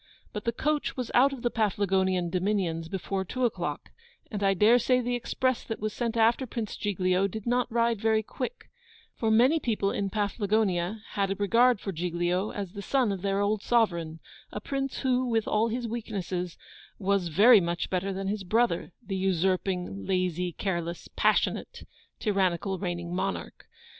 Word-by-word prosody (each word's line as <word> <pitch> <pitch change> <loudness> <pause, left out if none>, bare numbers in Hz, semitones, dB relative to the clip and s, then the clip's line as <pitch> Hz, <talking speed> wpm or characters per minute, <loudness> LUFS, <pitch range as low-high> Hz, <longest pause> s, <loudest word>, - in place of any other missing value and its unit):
But 210 - -5
the 230 - +2
coach 295 +5 -1
was 250 -2 -3
out 270 +3 +5
of 265 -3 -7
the 240 - +1
Paflagonian 190 -4 +1
dominions 180 -4 -1
before 190 +1 -2
two 255 +7 -1
o'clock; 235 - -3 0.4
and 205 -3 -3
I 195 -1 +3
dare 220 +6 +5
say 250 +2 +3
the 245 0 -1
express 255 +1 -1
that 225 - -4
was 215 0 -2
sent 235 -1 -2
after 230 +3 +3
Prince 220 -2 -4
Giglio 185 -1 +1
did 210 +2 -7
not 245 0 +1
ride 230 -2 +1
very 220 -1 +2
quick, 270 - -6 0.4
for 225 - -1
many 250 +9 +5
people 215 -7 0
in 200 -1 -1
Paflagonia 205 -1 0
had 195 -1 -1
a 195 - -1
regard 230 +4 +3
for 195 - -4
Giglio, 175 +3 -1
as 200 -3 -5
the 200 0 -7
son 250 +1 +1
of 195 -2 -4
their 195 0 0
old 205 0 +1
sovereign; 170 -10 +1 0.3
a - - -4
Prince 270 +4 -3
who, 255 -1 +1
with 225 -2 0
all 215 +2 +2
his 235 +1 -2
weaknesses, 190 -6 -4 0.4
was 195 -2 +1
very 210 +7 +7
much 170 0 -2
better 190 +1 0
than 195 0 -4
his 200 0 -2
brother, 205 -3 +1
the 195 -1 -3
usurping, 185 - -1
lazy, 180 -1 0
careless, 170 -2 -3
passionate, - - +1 0.4
tyrannical, 190 -2 0
reigning 175 -2 -3
monarch. 190 +2 -4
200 Hz, 170 wpm, -28 LUFS, 185-230 Hz, 0.4 s, very